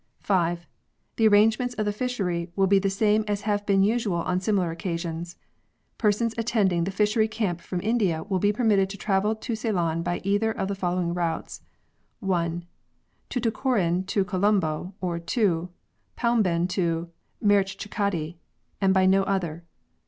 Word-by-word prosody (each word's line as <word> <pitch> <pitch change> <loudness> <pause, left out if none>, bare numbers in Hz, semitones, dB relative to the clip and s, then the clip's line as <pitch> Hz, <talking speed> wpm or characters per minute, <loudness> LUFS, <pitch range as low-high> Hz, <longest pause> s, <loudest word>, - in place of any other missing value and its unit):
" - - -49
5. 175 -3 0 0.5
The 225 - +5
arrangements 220 +4 +3
of 215 -1 -1
the 205 - 0
fishery 190 -8 -2
will 195 - +3
be 195 +1 +4
the 195 0 0
same 210 +2 +2
as 205 -1 -1
have 205 0 -1
been 195 -1 +4
usual 210 -3 +1
on 180 0 0
similar 185 -3 0
occasions. 170 -1 -4 0.6
Persons 225 +1 +1
attending 200 -7 +1
the - - -2
Fishery 210 +2 +2
Camp 205 -6 -2
from 180 - -4
India 200 -7 +1
will 195 -2 -1
be 205 +2 +3
permitted 210 -4 +2
to 200 - -7
travel 205 +2 +1
to 225 +2 -4
Ceylon 175 -8 -1
by 175 +1 -2
either 205 +3 +1
of 195 -3 -3
the - - 0
following 180 -2 -1
routes: 170 -2 -3 0.6
(1) 175 -4 -1 0.6
Tuticorin 220 -7 0
to 195 0 +1
Colombo 185 -3 0
or 175 -2 -2
(2) 175 -2 0 0.5
Paumben 200 -8 +2
to 170 -2 -1 0.3
Marichchikkaddi 195 -4 0 0.4
and 190 -1 +3
by 190 0 +4
no 190 +1 +5
other. 170 -4 -2
195 Hz, 150 wpm, -25 LUFS, 175-210 Hz, 0.6 s, The